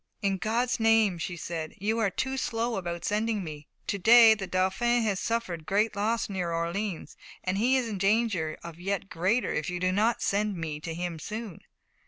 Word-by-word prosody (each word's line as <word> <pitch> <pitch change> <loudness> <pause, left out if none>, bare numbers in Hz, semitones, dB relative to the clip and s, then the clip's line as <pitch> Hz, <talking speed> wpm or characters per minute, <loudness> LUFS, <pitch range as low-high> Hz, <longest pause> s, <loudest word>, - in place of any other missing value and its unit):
"In 195 -1 +1
God's 235 +5 0
name," 225 -5 +3
she 175 +1 -4
said, 165 -1 -5
"you 220 +4 0
are 215 -3 +2
too 265 +7 -2
slow 235 -2 -1
about 170 -2 -4
sending 215 -1 0
me. 150 -3 -8 0.2
To 200 - -2
day 225 +2 +8
the 200 -3 -5
Dauphin 190 +7 +1
has 200 -3 0
suffered 185 -9 -2
great 210 +2 +1
loss 220 +3 0
near 185 -4 -3
Orleans, 170 +3 -3 0.3
and 185 +1 -1
he 255 +4 +3
is 250 -2 -1
in 210 -4 -4
danger 195 -6 +1
of 170 -1 -9
yet 195 +1 -3
greater 195 +9 +1
if 155 - -2
you 180 0 -3
do 185 +1 +1
not 215 +5 +2
send 205 -1 0
me 155 -2 -4
to 160 +1 -5
him 175 -1 -4
soon." 215 0 -6
200 Hz, 195 wpm, -28 LUFS, 175-225 Hz, 0.3 s, day